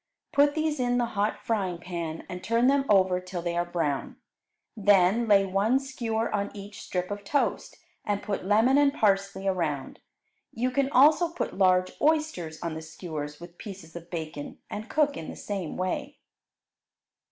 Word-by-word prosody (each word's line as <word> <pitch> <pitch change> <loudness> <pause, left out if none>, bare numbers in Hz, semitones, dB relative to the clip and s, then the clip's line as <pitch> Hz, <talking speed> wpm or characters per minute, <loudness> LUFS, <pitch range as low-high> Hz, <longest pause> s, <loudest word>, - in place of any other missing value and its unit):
Put 285 +1 +4
these 310 -2 0
in 245 -1 +1
the 240 - +2
hot 205 +1 0
frying 195 -6 0
pan 170 -2 -5
and 180 0 -7
turn 230 +1 +2
them 275 +1 +3
over 185 -3 +4
till 180 -1 -6
they 170 -1 -2
are 175 - +2
brown. 165 -5 -2 0.6
Then 205 +2 +4
lay 200 -2 +5
one 200 +7 +2
skewer 235 -5 -2
on 200 -1 0
each 205 0 -9
strip 180 +1 -3
of 205 0 -5
toast, 285 +8 -1 0.3
and 205 -1 -2
put 200 -3 -3
lemon 225 +8 +4
and 285 -1 +5
parsley 195 -3 +1
around. 160 -8 -2 0.5
You 250 +3 0
can 275 +1 +1
also 305 +6 +5
put 340 - -4
large 185 -1 +3
oysters 300 - +1
on 170 -2 -2
the 160 - -6
skewers 155 -2 -6
with 175 0 -12
pieces 185 -7 -9
of 170 0 -9
bacon, 155 -4 -6
and 215 +2 -6
cook 290 -2 +2
in 160 - -6
the - - -7
same 195 -6 -4
way. 185 0 -3
195 Hz, 170 wpm, -27 LUFS, 175-240 Hz, 0.6 s, lay